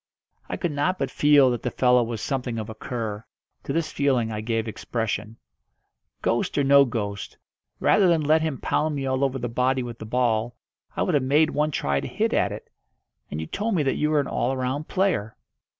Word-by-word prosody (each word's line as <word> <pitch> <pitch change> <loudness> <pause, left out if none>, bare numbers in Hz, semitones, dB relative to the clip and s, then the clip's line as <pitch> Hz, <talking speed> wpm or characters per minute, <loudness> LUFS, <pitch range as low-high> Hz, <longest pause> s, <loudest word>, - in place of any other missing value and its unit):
I - - -3
could 175 - -2
not 150 +6 0
but - - -2
feel 145 -3 +5
that 120 - -2
the 125 - -1
fellow 125 +1 +3
was 115 -2 -3
something 125 -2 -2
of 110 0 -4
a - - -6
cur. 110 -2 -5 0.4
To - - -3
this 165 -1 -1
feeling 130 -5 +1
I 105 -1 -3
gave 115 0 -1
expression. 110 0 -3 0.9
"Ghost - - 0
or 145 - +3
no 140 0 +6
ghost, 105 -5 -4 0.4
rather 195 - +4
than 170 -2 +3
let 155 +2 +3
him 155 -4 -1
pound 155 +3 0
me 135 -1 -3
all 130 +1 0
over 135 -1 0
the 120 -1 -3
body 125 +2 0
with 120 -2 -7
the 110 - -7
ball, 120 -1 0 0.4
I - - +1
would 180 - 0
have 145 - +3
made 150 +4 +3
one 150 +1 +1
try 70 - 0
to - - -5
hit - - -1
at - - +2
it. - - -9 0.6
And 75 - -4
you 80 - -3
told 210 - -2
me 155 - +2
that 135 - +1
you 150 - 0
were 155 -1 +3
an 140 - 0
all 130 +2 -1
round 130 +4 -2
player." 185 - 0
130 Hz, 215 wpm, -25 LUFS, 115-150 Hz, 0.9 s, no